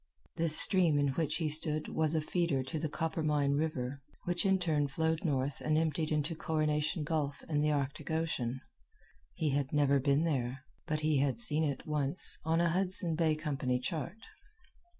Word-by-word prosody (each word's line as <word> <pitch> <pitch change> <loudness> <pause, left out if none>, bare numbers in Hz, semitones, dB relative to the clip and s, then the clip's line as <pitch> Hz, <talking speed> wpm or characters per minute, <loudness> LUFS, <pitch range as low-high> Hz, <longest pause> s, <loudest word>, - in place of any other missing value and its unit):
This 165 -2 +4
stream 175 -6 +6
in 145 -1 +2
which 150 +2 -1
he 160 -1 -1
stood 155 0 0
was 160 0 0
a 160 - +2
feeder 155 -4 0
to 155 +4 -4
the 155 0 -2
Coppermine 155 -3 0
River, 140 -3 -2 0.2
which 175 +2 0
in 190 0 +4
turn 155 -5 0
flowed 160 +4 -1
north 140 -4 -1
and 155 0 +2
emptied 160 0 0
into 155 +2 0
Coronation 155 -1 -1
Gulf 150 -2 -2
and 150 -2 0
the 150 - +2
Arctic 140 -1 -2
Ocean. 135 -6 -2 0.7
He 155 -3 0
had 140 -1 -1
never 140 -2 +3
been 140 +3 +2
there, 130 -4 -2 0.2
but 155 -2 -1
he 155 -2 +2
had 135 -4 0
seen 150 +7 +1
it, 140 -4 -2
once, 150 +1 -1
on 160 +2 +1
a 170 0 +3
Hudson 180 -1 0
Bay 160 -1 +2
Company 140 -5 -1
chart. 165 - -4
155 Hz, 175 wpm, -32 LUFS, 140-160 Hz, 0.7 s, stream